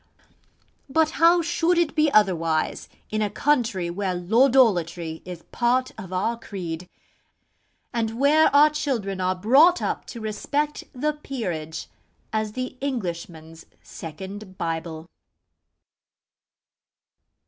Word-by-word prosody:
But 315 +3 +2
how 340 +1 +6
should 345 +1 +1
it 340 -3 +2
be 310 -1 +3
otherwise 165 - +1 0.2
in 215 0 -1
a 210 - +1
country 220 -11 0
where 190 0 -2
Lordolatry 180 - +2
is 175 -2 -8
part 250 +2 +1
of 185 - -9
our 225 +6 -1
creed, 180 -4 -6 1.0
and 225 0 -2
where 300 +3 +5
our 295 +2 +6
children 230 -11 -2
are 185 0 +1
brought 275 - +5
up - - -3
to 235 - -8
respect 285 +8 -2
the 300 +4 -1
'Peerage' 180 - -5 0.5
as 215 -1 -1
the 255 +1 -5
Englishman's 170 - -5 0.2
second 190 +4 -9
Bible? 165 0 -4
215 Hz, 110 wpm, -24 LUFS, 175-275 Hz, 1.0 s, how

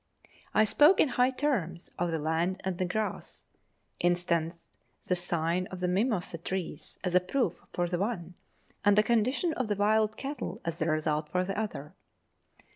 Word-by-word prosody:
I 215 - +6
spoke 295 - +5
in 300 - +5
high 250 +1 +3
terms 255 - -2
of 175 0 +1
the 165 - 0
land 165 +5 0
and 190 -2 -2
the 185 - +1
grass; 215 +4 -4 0.5
instanced 170 -1 0 0.4
the 180 - +1
sign 175 0 -1
of 185 - -8
the 180 - 0
mimosa 185 -3 0
trees 170 -3 -4
as 180 -1 -1
a 180 - +7
proof 185 +1 0 0.2
of 175 0 0
the 175 - 0
one, 185 -5 -2 0.5
and 205 0 +5
the 210 - +7
condition 245 +9 +1
of 255 -6 -2
the 205 - 0
wild 215 +1 +2
cattle 270 -8 -5
as 165 0 -3
the 160 - +1
result 155 -1 0
of 180 0 +2
the 195 +1 -3
other. 170 -9 -4
185 Hz, 175 wpm, -30 LUFS, 170-215 Hz, 0.5 s, a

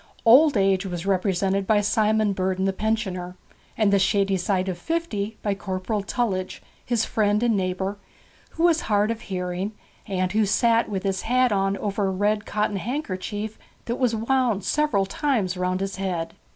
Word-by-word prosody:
Old 270 +3 +7
age 195 -1 +2
was 180 -2 -5
represented 195 0 0
by 215 -1 +4
Simon 215 0 +2
Burden 190 0 -1
the 195 - +1
pensioner, 190 -4 -2 0.4
and 210 -3 +3
the 200 - +5
shady 195 0 +2
side 185 0 0
of 180 -2 -3
fifty 225 - -2
by 205 - +1
Corporal 195 +2 -3
Tullidge, 195 -3 -2 0.2
his 235 -2 0
friend 210 0 +1
and 235 -2 +3
neighbour, 190 +1 -2 0.5
who 330 - -2
was 335 -2 +4
hard 210 +1 +1
of 230 0 -5
hearing, 185 +1 -3 0.3
and 195 +2 0
sat 230 +1 +3
with 195 -3 -3
his 195 -1 -1
hat 250 +1 +2
on 195 0 +1
over 200 -1 -1
a - - 0
red 210 +2 0
cotton 210 -1 -1
handkerchief 210 - -4 0.3
that 235 +1 -2
was 245 -3 +2
wound 230 -3 +1
several 295 -9 +1
times 205 -4 -1
round 185 +1 -1
his 195 0 -3
head. 180 -4 -3
200 Hz, 165 wpm, -24 LUFS, 190-220 Hz, 0.5 s, Old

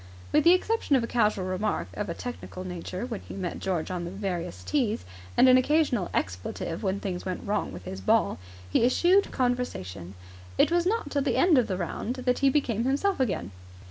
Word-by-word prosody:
With 300 +1 +3
the 340 - +8
exception 370 -5 +1
of 255 - +2
a - - 0
casual 210 -5 +1
remark 185 +3 -1
of 205 -2 -4
a 170 - -3
technical 240 -6 -7
nature 180 +3 -5
when 230 -4 -4
he - - -10
met 185 -3 -4
George 180 -3 -2
on 180 -1 -3
the 170 - -4
various 180 -3 -4
tees, 240 -7 0 0.3
and 260 - +7
an 255 0 +8
occasional 255 - +2
expletive 95 - -3
when 195 -1 -1
things 185 -3 -4
went 185 -1 -4
wrong 205 0 -1
with 90 -1 -9
his 95 0 -6
ball, 95 - +2 0.3
he 90 - +2
eschewed 355 +11 +4
conversation. 100 - -2 0.4
It - - +4
was 345 0 +2
not 420 -8 -1
till 285 - +1
the 275 - 0
end 345 -6 +5
of 240 - +1
the 185 - -2
round 195 +7 -3
that 250 -1 0
he 275 - +4
became 245 -6 +1
himself 290 +9 +1
again. 185 - -1
215 Hz, 205 wpm, -27 LUFS, 180-270 Hz, 0.4 s, the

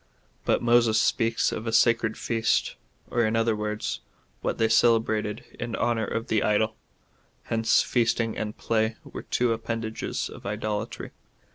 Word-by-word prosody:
"^ - - -36 0.4
But - - +2
Moses 120 -2 +4
speaks 115 0 +1
of 110 +1 -5
a - - 0
sacred 115 -1 +3
feast, 115 -1 0 0.4
or 120 - +2
in 110 0 +1
other 115 -1 +2
words, 105 0 -3 0.4
Avhat - - -1
they 115 - +3
celebrated 110 -2 +2 0.2
in 120 -1 -3
honour 115 -2 0
of 115 - -2
the 110 -2 +1
idol. 110 +1 +1 0.7
Hence 115 0 +2
feasting 115 -2 +1
and 105 0 -4
play 110 0 0
were - - -8
two 120 -2 +1
appendages 115 0 -3
of - - -11
idolatry. 105 +1 -4
115 Hz, 150 wpm, -26 LUFS, 110-115 Hz, 0.7 s, Moses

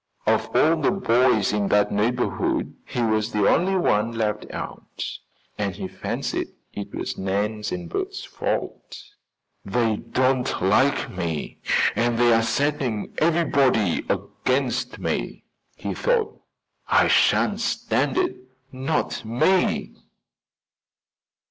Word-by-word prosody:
Of - - +1
all 160 +2 +4
the 155 - +2
boys 125 - +2
in 105 -1 +1
that 105 0 +3
neighborhood 120 +4 0
he 120 - -2
was 110 0 +1
the 105 -2 +2
only 190 +3 +3
one 115 - +1
left 110 -2 -2
out, - - -6 0.5
and 100 -3 -1
he 95 -1 -5
fancied 95 0 -3 0.3
it 100 - -6
was - - -4
Nan 105 +3 -1
and 90 -1 -4
Bert's - - -4
fault. - - -4 0.7
"They 110 +1 +1
don't 130 +2 0
like 120 +10 +2
me 85 -4 -4 0.4
and 120 0 +1
they 120 0 +5
are 115 - +4
setting 135 -3 -1
everybody 140 - +2
against 125 -1 -1
me," - - -3 0.3
he - - -4
thought. 485 -3 0 0.5
"I - - +4
shan't - - +3
stand - - 0
it, 370 -1 +1 0.4
not 135 +4 -2
me!" 125 +12 +1
115 Hz, 115 wpm, -24 LUFS, 105-135 Hz, 0.7 s, they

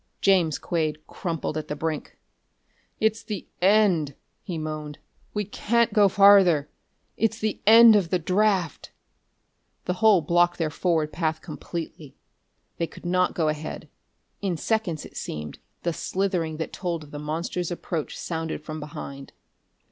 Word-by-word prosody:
James 180 -6 +3
Quade 155 -3 -2
crumpled 165 -3 -4
at 155 - -8
the 150 - -3
brink; 155 0 -4 0.8
"It's 220 +1 +1
the 210 -5 -6 0.2
end!" 185 -8 +3 0.3
he 175 - -5
moaned. 155 -1 -5 0.4
"We 210 0 -1
can't 235 +4 +1
go 205 -2 +5
farther! 190 -7 +6 0.5
It's 225 0 +1
the 215 -2 -2
end 225 0 +9
of 190 -5 +2
the 180 - +2
draft!" 185 -1 0 1.0
The 180 - 0
hole 215 -5 +6
blocked 175 +2 +3
their 160 -3 -1
forward 160 -2 0
path 160 -2 -1
completely. 160 -2 -7 0.6
They 170 - -1
could - - -14
not 180 +1 +1
go 160 -2 +1
ahead.... 155 0 -4 0.5
In 190 -4 -1
seconds, 200 -4 -1
it - - -14
seemed, 75 -1 -6 0.2
the 170 - 0
slithering 180 -4 -2
that 160 - -5
told 170 -4 -3
of 150 - -15
the 145 - -6
monster's 165 +3 -3
approach 170 -3 -4
sounded 160 -2 -4
from 155 +1 -6
behind. 140 -2 -8
170 Hz, 145 wpm, -25 LUFS, 155-195 Hz, 1.0 s, end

